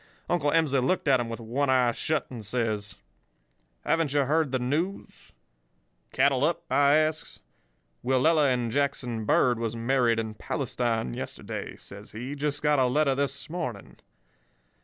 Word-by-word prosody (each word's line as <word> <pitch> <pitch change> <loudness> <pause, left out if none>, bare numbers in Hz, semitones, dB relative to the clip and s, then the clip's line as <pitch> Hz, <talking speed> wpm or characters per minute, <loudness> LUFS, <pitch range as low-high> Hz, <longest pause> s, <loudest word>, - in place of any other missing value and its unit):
Uncle 170 -4 +1
Emsley 150 -3 +2
looked 180 +4 0
at 135 -2 +5
'em 120 -1 -3
with 115 - -5
one 125 +5 -1
eye 125 -2 +4
shut 155 +5 -1
and 120 -3 -7
says: 105 -2 -2 0.9
"'Haven't 165 -4 +1
ye 145 - +4
heard 150 +1 +1
the 130 - +1
news?' 150 +10 -3 0.8
"'Cattle 135 0 +2
up?' 170 +2 +1
I 140 0 +5
asks. 155 0 -1 0.6
"'Willella 140 +3 +3
and 120 -2 -1
Jackson 125 -4 -1
Bird 120 +2 +3
was 115 -1 -2
married 120 0 +2
in 110 -1 -3
Palestine 115 - -2
yesterday,' - - -6
says 100 +1 -11
he. 125 +6 -5
'Just 145 0 -2
got 150 -1 +3
a 130 - +4
letter 140 +2 +2
this 140 0 -2
morning. 175 +1 -6
130 Hz, 150 wpm, -27 LUFS, 120-150 Hz, 0.9 s, at